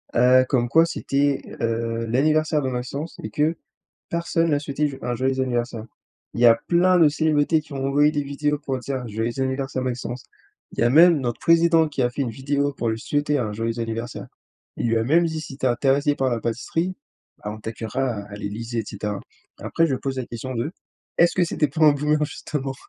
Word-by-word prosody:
heu, 125 +1 +6
comme 120 -3 +2
quoi 165 +6 +5
c'était, 140 -3 0 0.2
heu, 115 0 -1
l'anniversaire 155 +5 +2
de 130 - -1
Maxence 130 +6 -5
et 110 - -4
que 150 +8 +1 0.6
personne 170 0 0
lui 155 - +3
a - - 0
souhaité 145 +1 -1
j 135 -2 -8
un 120 0 -2
joyeux 130 +2 0
anniversaire. 120 -3 -2 0.5
Il - - -4
y 120 - +7
a 115 - +8
plein 180 +1 +4
de 165 -3 +6
célébrités 155 +1 +2
qui 150 - -15
ont 135 -1 -2
envoyé 145 +2 +4
des 145 -2 -1
vidéos 145 +1 -1
pour 135 -2 -3
dire: 130 0 -4
«Joyeux 115 +4 -3
anniversaire, 130 0 -2
Maxence». 125 0 -4 0.5
Il - - -4
y - - +2
a 120 - +4
même 165 +4 +7
notre 120 -3 -3
Président 165 -1 +4
qui 140 -3 -2
a 120 - +2
fait 125 - -6
une 130 - -2
vidéo 140 +4 -1
pour 115 -2 -1
lui 110 0 -3
souhaiter 145 +3 0
un 110 -5 -2
joyeux 115 +2 -2
anniversaire. 115 +1 -4 0.5
Il - - -1
lui 115 0 +2
a - - +1
même 165 +8 +4
dit: 160 -1 -2
«Si 145 -3 -8
tu 135 - -5
es - - +5
intéressé 140 +4 +2
par 135 -2 0
la 120 -1 -1
pâtisserie, 165 +11 -2 0.5
ah 105 - -4
on 110 - -8
t'accueillera, 110 +2 -3
heu, - - -9
à 105 - -9
l'Élysée» 115 +3 -5
et - - -6
cetera. 105 0 -4 0.4
Après 165 - +1
je 140 - 0
pose 135 +1 -4
la 125 - -3
question 130 +2 -6
de: 120 +6 -2 0.5
«Est-ce 170 0 +5
que 185 - +2
c'était 155 -3 0
pas 155 +4 +1
un 150 - +7
boomer 150 +1 +1
justement?» 135 -2 -4
135 Hz, 220 wpm, -23 LUFS, 120-150 Hz, 0.6 s, a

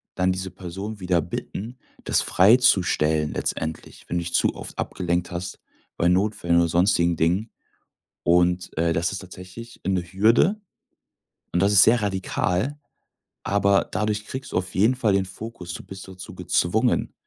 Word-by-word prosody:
dann 90 0 +2
diese 95 0 -4
Person 95 +4 -7
wieder 90 -2 +1
bitten, 115 - -6 0.3
das - - +2
freizustellen 90 -8 +3
letztendlich, 80 0 -4
wenn 90 - -2
du 85 - -1
dich 85 - -6
zu - - +2
oft - - -9
abgelenkt 90 0 -2
hast 90 0 -5 0.4
bei 85 - +2
Notfällen 90 -2 +1
oder 85 0 +4
sonstigen 85 0 +2
Dingen. 90 +7 0 0.7
Und, 90 +1 +2
äh, 85 +1 +2
das 85 +4 0
ist 100 - -4
tatsächlich 95 +5 -11
'ne 95 -2 +1
Hürde 115 - +2 0.9
und 90 - +1
das 100 +1 +3
ist 100 -2 +8
sehr 115 +1 +4
radikal, 95 +5 -1 0.7
aber 100 0 +2
dadurch 105 0 -1
kriegst 130 0 -6
du - - +1
auf 90 0 -3
jeden 110 +7 +3
Fall 115 -5 +1
den 95 -1 +2
Fokus, 95 -2 -8
du - - -7
bist 95 0 -10
dazu 95 -1 -10
gezwungen, - - +1
95 Hz, 155 wpm, -24 LUFS, 85-105 Hz, 0.9 s, ist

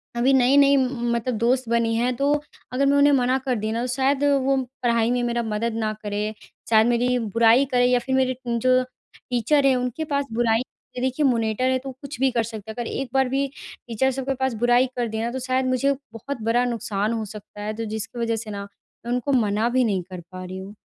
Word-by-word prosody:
अभी 255 +3 +3
नई-नई 275 +2 +5
मतलब 240 -2 -1
दोस्त 245 +2 +1
बनी 230 -1 +1
हैं 245 +2 +1
तो 280 +2 +2 0.4
अगर 275 +2 +2
मैं 280 +1 +3
उन्हें 285 0 +5
मना 255 0 +2
कर 255 -2 +1
दी 215 0 -2
ना 230 +1 -1
तो 250 - -2
शायद 270 +2 +1 0.2
वो 270 0 +2 0.3
पढ़ाई 235 0 +2
में 245 0 +1
मेरा 240 0 -1
मदद 220 +1 -2
ना 215 - 0
करें 210 +1 -2 0.4
शायद 220 0 +5
मेरी 245 +1 +2 0.2
बुराई 230 +4 +5
करे 245 0 +4
या 250 0 +3
फ़िर 265 +2 -2
मेरे 260 -1 +2
जो 255 +2 +2 0.3
टीचर 255 +4 +1
हैं 265 - +5
उनके 250 +5 -2
पास 280 -2 -1
बुराई 230 0 +2 0.4
देखिए, 260 +3 0
मॉनिटर 230 -1 +1
है 260 - +2
तो 270 +1 -7
कुछ 280 -1 -8
भी 270 0 +3
कर 235 -2 +1
सकते 220 -1 -7
हैं। - - -10
अगर 240 -1 -4
एक 270 -2 -3
बार 265 -1 +3
भी 275 +1 0 0.4
टीचर 250 +4 +1
सब 265 0 -4
के - - +2
पास 265 -1 -1
बुराई 245 +1 +5
कर 240 -1 -1
दे 220 0 -3
ना 235 +1 -2
तो 260 - -4
शायद 255 +1 0
मुझे 255 +2 +2 0.2
बहुत 245 +2 -6
बड़ा 240 +2 +2
नुकसान 220 -2 -1
हो 225 -1 -2
सकता 210 0 -10
है। 215 +1 -3
तो 225 +1 -4
जिसकी 220 +3 -5
वजह 230 -1 0
से 220 -1 -6
ना 200 0 -5 0.4
मैं 240 - -3
उनको 250 +3 -1
मना 220 -2 +2
भी 255 +1 +2
नहीं 195 -5 0
कर 180 -1 -6
पा 185 0 -7
रही 185 +1 -7
हूँ। 195 +2 -8
245 Hz, 230 wpm, -23 LUFS, 225-260 Hz, 0.4 s, नई-नई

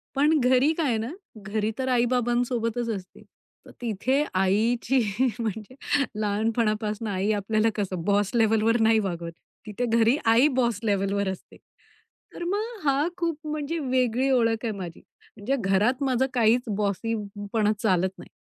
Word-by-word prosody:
पण 295 +2 +3
घरी 255 +4 +4
काय 280 -9 +1
ना, 225 +4 -4 0.3
घरी 210 +2 -2
तर 260 - -2
आई-बाबांसोबतच 240 -1 0
असते, 185 -1 -11 0.4
तर - - -13
तिथे 245 +5 0
आईची 220 +7 +1 0.4
म्हणजे 220 +2 -4 0.4
लहानपणापासनं 215 0 -1
आई 195 +2 0
आपल्याला 215 +2 +1
कसं 190 -4 -3
बॉस 205 -1 +2
लेव्हलवर 225 +1 +3
नाही 220 0 +4
वागवत. 170 -4 -3 0.3
तिथे 215 +3 -3
घरी 230 +3 +3
आई 230 +5 +5
बॉस 235 -4 +1
लेव्हलवर 200 -1 0
असते, 190 - -8 0.8
तर - - -6
मग 425 +6 -3
हा 280 +1 +2
खूप 335 -4 -1
म्हणजे 305 +2 -3
वेगळी 255 -2 +1
ओळख 230 -3 +2
आहे 225 - 0
माझी. 175 -3 -7 0.4
म्हणजे 230 +7 -1
घरात 215 +7 +1
माझं 260 -1 +2
काहीच 235 0 +3 0.2
बॉसीपणा 205 0 -1
चालत 190 -5 +2
नाही - - -12
225 Hz, 135 wpm, -25 LUFS, 205-255 Hz, 0.8 s, आई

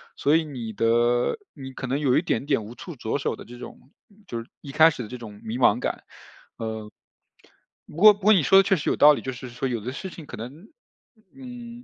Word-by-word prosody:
所 145 +2 +2
以 165 - +3
你 125 -7 -7
的 120 - +2 0.2
你 135 -3 -9
可 130 - -6
能 130 +3 -1
有 135 -4 +2
一 - - +3
点 140 -5 -2
点 135 -7 0
无 110 - -10
处 170 +6 -10
着 120 +2 -3
手 - - -2
的 - - -11
这 120 - -12
种 - - -10 0.5
就 115 - -4
是 115 - -9
一 140 - -9
开 160 +4 +6
始 150 - -7
的 - - -8
这 125 - -7
种 105 -4 -11
迷 110 +2 -4
茫 125 - +4
感。 - - -3 0.5
呃。 110 -1 -6 1.0
不 - - -14
过 210 +4 +8
不 205 - -17
过 210 +3 +5
你 180 -7 +3
说 195 +8 +5
得 - - +5
确 195 - +2
实 150 - -2
有 - - +1
道 150 +1 +8
理， - - -4
就 130 - -4
是 125 +1 -9
说 125 +3 -3
有 120 -2 -2
的 120 +5 -5
事 165 +8 -6
情 165 -3 -11
可 125 - -9
能， 140 - -10 0.7
嗯， 245 -2 -10
135 Hz, 265 characters per minute, -24 LUFS, 120-165 Hz, 1.0 s, 过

